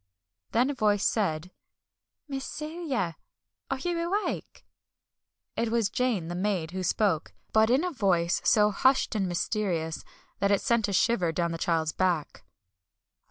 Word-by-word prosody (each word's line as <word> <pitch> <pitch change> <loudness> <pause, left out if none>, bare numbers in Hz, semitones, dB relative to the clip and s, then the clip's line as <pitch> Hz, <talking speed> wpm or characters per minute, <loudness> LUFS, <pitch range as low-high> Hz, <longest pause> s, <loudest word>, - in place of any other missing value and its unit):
Then 250 +4 +2
a - - -3
voice 210 -5 +2
said: 180 -5 0 0.8
"Miss 270 -2 -4
Celia! 300 - -3 0.5
Are 270 - -1
you 345 +5 -2
awake?" 375 +5 -3 0.9
It 230 - 0
was 230 -3 +1
Jane, 235 -10 0
the 175 - -4
maid, 180 -3 -1
who 185 +1 -4
spoke, 185 -2 0 0.2
but 220 0 +5
in 260 +6 +3
a 360 - -1
voice 185 - +1
so 210 -1 +4
hushed 260 +7 +2
and 200 -4 0
mysterious 175 -3 -2 0.4
that 200 - +2
it 200 -1 +4
sent 235 -3 +2
a 200 - -3
shiver 185 -4 +2
down 170 +1 -1
the 165 - -4
child's 160 -2 +1
back. 175 -3 -1
205 Hz, 150 wpm, -28 LUFS, 175-250 Hz, 0.9 s, but